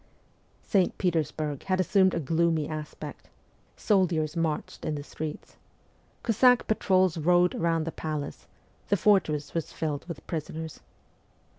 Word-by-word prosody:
St. 190 -4 +1
Petersburg 155 -5 -1
had 185 -1 +1
assumed 190 0 +3
a - - 0
gloomy 160 0 +1
aspect. 155 -1 -7 0.5
Sol 195 -4 +3
diers 155 -2 -2
marched 165 -2 -2
in 155 - -1
the 145 - -5
streets. 150 +1 -7 0.7
Cossack 245 +2 +4
patrols 185 -5 +2
rode 175 +2 +4
round 165 -1 0
the 165 - -3
palace, 145 - -5 0.4
the 200 - +3
fortress 155 -8 +2
was 165 -2 -3
filled 150 -1 -3
with 170 -4 -8
prisoners. 160 0 -5
165 Hz, 130 wpm, -28 LUFS, 155-185 Hz, 0.7 s, Cossack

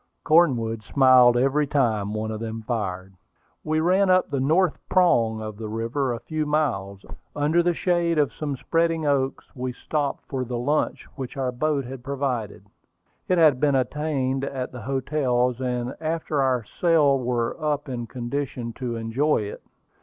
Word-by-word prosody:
Cornwood 125 -9 +3
smiled 125 0 +5
every 135 +4 +2
time 110 -8 +1
one 110 +1 -2
of 110 - -4
them 115 0 -5
fired. 95 -5 -3 0.5
We 155 0 0
ran 185 +3 +3
up 185 -3 +3
the 140 - 0
"North 160 +5 +2
Prong" 115 -12 +3
of 110 -1 -7
the 110 -1 -6
river 115 +5 -1
a 120 - -3
few 155 +5 -3
miles. 100 -11 -1 0.3
Under 150 +4 +2
the 175 0 +1
shade 170 -2 +1
of 145 -6 +2
some 145 -3 -4
spreading 165 +1 0
oaks 135 -2 0
we 125 -1 -3
stopped 145 +3 -3
for 130 -2 -2
the 125 0 -4
lunch 145 +6 -1
which 130 -1 -6
our 130 -2 -1
host 140 +2 -1
had 130 -1 -8
provided. 125 -7 -3 0.6
It 185 - +2
had 155 -6 +5
been 145 -1 +2
obtained 135 0 -1
at 130 -2 -4
the 125 - -8
hotels, 130 -1 0
and 125 0 -2
after 155 -2 -1
our 130 -3 +1
sail 150 - +3
we 125 - -5
were 125 +5 -1
in 120 -3 -5
condition 125 -1 -4
to 125 -3 -3
enjoy 115 +6 0
it. 100 - -7
130 Hz, 165 wpm, -24 LUFS, 120-150 Hz, 0.6 s, smiled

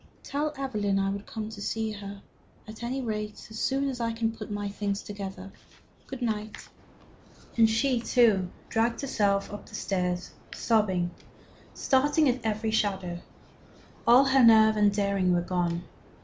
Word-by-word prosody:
"Tell 295 +2 -2
Evelyn 210 -8 -1
I 195 0 +1
will 200 0 -4
come 215 +1 -6
to 215 -2 -9
see 220 +1 -2
her, 200 -1 -8 0.4
at 215 +1 -10
any 255 +3 -3
rate, 210 -2 -4
as 220 - -6
soon 275 +1 +1
as 260 -3 -3
I 230 -1 -1
can 225 0 -1
put - - -8
my 205 0 -3
things 200 0 -3
together. 195 -2 -7 0.6
Good 265 -2 -6
night." 215 -2 -4 0.9
And 225 -1 +5
she, 245 +3 +2
too, 220 -7 +3 0.2
dragged 230 +1 0
herself 205 -7 0
up 205 - -9
stairs 180 -2 -2 0.2
sobbing, 190 -6 +1 0.6
starting 290 +3 +3
at 250 -1 0
every 220 0 -1
shadow. 190 -5 -1 0.9
All 245 +4 +7
her 265 -1 +4
nerve 220 -1 +7
and 210 -1 +4
daring 200 -3 +1
were 175 - +2
gone. 175 -1 -1
215 Hz, 150 wpm, -28 LUFS, 200-235 Hz, 0.9 s, All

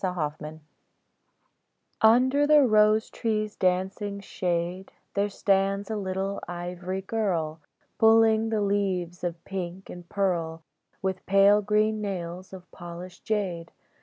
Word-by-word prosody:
LE 175 -6 -1
PANNEAU 155 0 -8 1.4
UNDER 260 +6 +5
the 300 -1 +6
rose 215 -1 +4
tree's 215 -2 -2
dancing 190 +2 -1
shade 180 -1 -3 0.2
There 200 +1 0
stands 195 +1 0
a - - -1
little 195 0 -3
ivory 180 +2 -5
girl, 175 -8 -1 0.4
Pulling 225 0 +5
the 220 -2 0
leaves 190 -4 -1
of 170 -1 -4
pink 185 -1 -6
and 175 -1 -11
pearl 170 -5 -1 0.4
With 190 -1 -2
pale 200 +1 +5
green 215 +1 +1
nails 185 -2 -5
of 185 -1 -12
polished 175 +1 -10
jade. 185 -6 -2
195 Hz, 120 wpm, -26 LUFS, 175-210 Hz, 1.4 s, the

